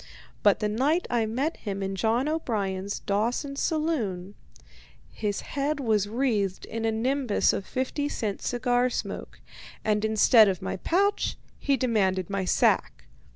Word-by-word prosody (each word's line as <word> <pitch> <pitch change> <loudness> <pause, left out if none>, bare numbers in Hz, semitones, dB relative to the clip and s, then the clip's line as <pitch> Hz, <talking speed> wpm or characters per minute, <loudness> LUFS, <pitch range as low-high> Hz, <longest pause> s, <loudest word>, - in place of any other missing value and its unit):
But 205 +1 +4
the 210 - +1
night 275 +11 +1
I 230 -2 +1
met 270 +9 -1
him 200 -2 -4
in 195 0 -3
John 230 +7 +1
O'Brien's 200 -10 -2
Dawson 235 +8 -1
saloon, 250 - -1 0.8
his 205 -2 -2
head 285 +1 -2
was 215 -6 +1
wreathed 215 -6 0
in 225 0 -4
a 225 - +2
nimbus 250 +1 +1
of 195 - -4
fifty 275 +3 -2
cent 210 -8 -3
cigar 245 0 +1
smoke, - - -5 0.5
and 210 -1 +1
instead 220 +1 +6
of 190 -3 0
my - - -4
pouch 395 - +1 0.2
he 275 -2 +1
demanded 195 -7 +1
my 195 -1 -1
sack. - - +2
225 Hz, 145 wpm, -27 LUFS, 200-270 Hz, 0.8 s, instead